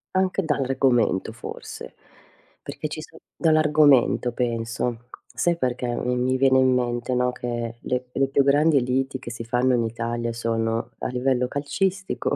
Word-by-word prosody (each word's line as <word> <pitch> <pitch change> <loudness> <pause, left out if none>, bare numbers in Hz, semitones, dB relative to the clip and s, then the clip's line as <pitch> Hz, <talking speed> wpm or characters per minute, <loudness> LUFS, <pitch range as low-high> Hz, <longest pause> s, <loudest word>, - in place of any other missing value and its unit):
Anche 190 +1 +2
dall'argomento 130 - +1
forse, 115 - -9 0.7
perché - - -5
ci - - -6
so - - -11 0.2
dall'argomento 150 -6 +4
penso. 120 0 -3 0.2
Sai 175 0 +1
perché 125 -5 -2 0.2
mi 125 0 0
mi 130 +1 +1
viene 130 0 +4
in 130 0 +4
mente, 120 0 -1
no, 125 0 +1
che 120 -1 -4
le 125 +1 -3
le 135 +1 +1
più 140 0 +3
grandi 145 0 +4
liti 130 +2 -1
che 125 - -8
si 115 0 -6
fanno 125 +2 +2
in 120 - +1
Italia 115 +1 -3
sono 115 0 -2
a - - -3
livello 125 0 0
calcistico 185 +8 -2
125 Hz, 150 wpm, -24 LUFS, 120-135 Hz, 0.7 s, dall'argomento